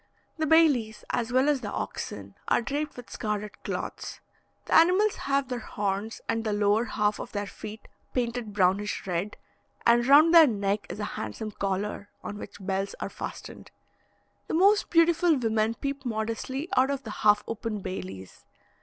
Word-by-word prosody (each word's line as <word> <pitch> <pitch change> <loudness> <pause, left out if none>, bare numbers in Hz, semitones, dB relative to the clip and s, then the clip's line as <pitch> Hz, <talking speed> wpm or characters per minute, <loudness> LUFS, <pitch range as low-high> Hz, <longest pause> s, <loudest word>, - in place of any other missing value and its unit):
The 315 - +1
bailis, 285 -9 +3
as 240 0 -1
well 260 +3 +3
as 290 -3 +2
the 205 -3 -5
oxen, 100 -1 -5
are - - +3
draped 285 +5 -3
with 245 - -10
scarlet 210 -1 -4
cloths: - - -5 0.5
the - - -3
animals 370 +6 +5
have 275 -1 +1
their 250 -1 -3
horns 205 0 -3
and 225 0 0
the 215 -2 -1
lower 205 +2 +2
half 210 -4 0
of - - -7
their 205 -1 -2
feet 215 +2 -9 0.2
painted 240 -3 -2
brownish 200 +1 +1
red, 185 +3 -2 0.5
and 240 +1 +4
round 305 +4 +7
their 330 -2 +9
neck 205 -3 -1
is - - -6
a - - -2
handsome 205 - -5
collar, 200 +1 -3
on 205 - -6
which - - -9
bells 195 0 -2
are - - -3
fastened. - - -8 0.8
The - - -2
most 400 +4 +4
beautiful 335 -1 +4
women 225 -2 +1
peep 275 +3 -4
modestly 230 +5 -3
out 260 +1 +4
of 280 -1 -2
the 220 - -6
half 210 0 +5
open 220 -2 -4
bailis. 95 - -7
225 Hz, 165 wpm, -27 LUFS, 205-275 Hz, 0.8 s, their